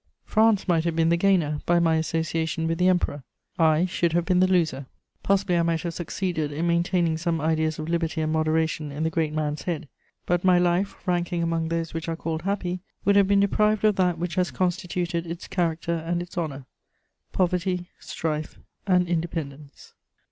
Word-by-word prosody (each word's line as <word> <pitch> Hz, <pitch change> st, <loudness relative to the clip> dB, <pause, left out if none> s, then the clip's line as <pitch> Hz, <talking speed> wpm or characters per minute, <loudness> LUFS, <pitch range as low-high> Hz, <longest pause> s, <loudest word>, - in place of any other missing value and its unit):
France 220 Hz, -3 st, +3 dB
might 165 Hz, -3 st, +2 dB
have 170 Hz, -1 st, -1 dB
been 165 Hz, 0 st, +3 dB
the 170 Hz, -, +4 dB
gainer 170 Hz, -5 st, +2 dB
by 175 Hz, -, +4 dB
my 165 Hz, -1 st, +3 dB
association 160 Hz, 0 st, -1 dB
with 165 Hz, +1 st, -1 dB
the 180 Hz, -, +4 dB
Emperor; 175 Hz, -6 st, +1 dB, 0.4 s
I 160 Hz, +1 st, +4 dB
should 170 Hz, -2 st, 0 dB
have 175 Hz, 0 st, +1 dB
been 180 Hz, -1 st, +2 dB
the 185 Hz, -, +5 dB
loser. 160 Hz, -8 st, +1 dB, 0.3 s
Possibly 195 Hz, -2 st, +1 dB
I -, -, +4 dB
might 165 Hz, -1 st, 0 dB
have 170 Hz, -1 st, -3 dB
succeeded 170 Hz, -3 st, -3 dB
in 155 Hz, +4 st, -2 dB
maintaining 170 Hz, -1 st, +1 dB
some 165 Hz, -1 st, -1 dB
ideas 160 Hz, 0 st, 0 dB
of 155 Hz, -, -5 dB
liberty 165 Hz, -1 st, -1 dB
and 155 Hz, 0 st, -1 dB
moderation 155 Hz, -1 st, 0 dB
in 145 Hz, +3 st, -3 dB
the 160 Hz, -, 0 dB
great 160 Hz, -2 st, 0 dB
man's 150 Hz, -1 st, -2 dB
head; 165 Hz, -3 st, -3 dB, 0.4 s
but 175 Hz, 0 st, 0 dB
my 185 Hz, -1 st, +5 dB
life, 175 Hz, +2 st, +1 dB
ranking 175 Hz, -1 st, 0 dB
among 165 Hz, -1 st, 0 dB
those 165 Hz, 0 st, -2 dB
which 165 Hz, 0 st, -4 dB
are 165 Hz, -, -1 dB
called 160 Hz, -1 st, -3 dB
happy, 185 Hz, -1 st, -2 dB, 0.3 s
would 200 Hz, -, +4 dB
have 200 Hz, -1 st, +5 dB
been 200 Hz, 0 st, +4 dB
deprived 210 Hz, +1 st, +2 dB
of 210 Hz, -2 st, +4 dB
that 180 Hz, -2 st, +2 dB
which 170 Hz, 0 st, -3 dB
has 180 Hz, +1 st, +1 dB
constituted 175 Hz, -1 st, -2 dB
its 170 Hz, +1 st, -6 dB
character 170 Hz, -2 st, -1 dB
and 170 Hz, +1 st, -2 dB
its 175 Hz, -, -13 dB
honour: 145 Hz, -6 st, -4 dB, 0.7 s
poverty, 180 Hz, 0 st, -1 dB
strife 155 Hz, -2 st, -4 dB, 0.3 s
and 180 Hz, -2 st, +3 dB
independence. 160 Hz, -4 st, -5 dB
170 Hz, 190 wpm, -25 LUFS, 160-180 Hz, 0.7 s, the